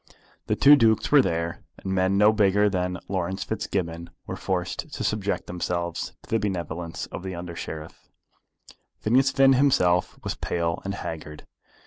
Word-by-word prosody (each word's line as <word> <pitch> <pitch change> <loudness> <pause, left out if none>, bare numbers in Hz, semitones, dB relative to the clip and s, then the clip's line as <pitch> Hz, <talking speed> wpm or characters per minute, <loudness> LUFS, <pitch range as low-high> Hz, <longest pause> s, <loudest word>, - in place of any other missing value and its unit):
The - - +1
two 145 +1 +8
Dukes 115 -5 +3
were 145 -1 +8
there, 85 -5 -2 0.2
and 95 - -4
men 95 +1 +2
no 105 +2 +6
bigger 105 -1 +3
than 90 -1 -1
Laurence 95 0 -2
Fitzgibbon 85 -6 -3 0.2
were - - -5
forced - - -3
to - - -4
subject 100 -2 -1
themselves 85 -1 -3
to - - -18
the 115 - +3
benevolence 85 -4 -4
of - - -6
the 95 -1 -5
Under 85 0 -7
Sheriff. 80 -1 -8 0.9
Phineas 130 +5 +2
himself 135 -10 +4
was - - -2
pale 85 -1 -2
and 100 0 -3
haggard. 75 -4 -7
95 Hz, 150 wpm, -25 LUFS, 85-105 Hz, 0.9 s, two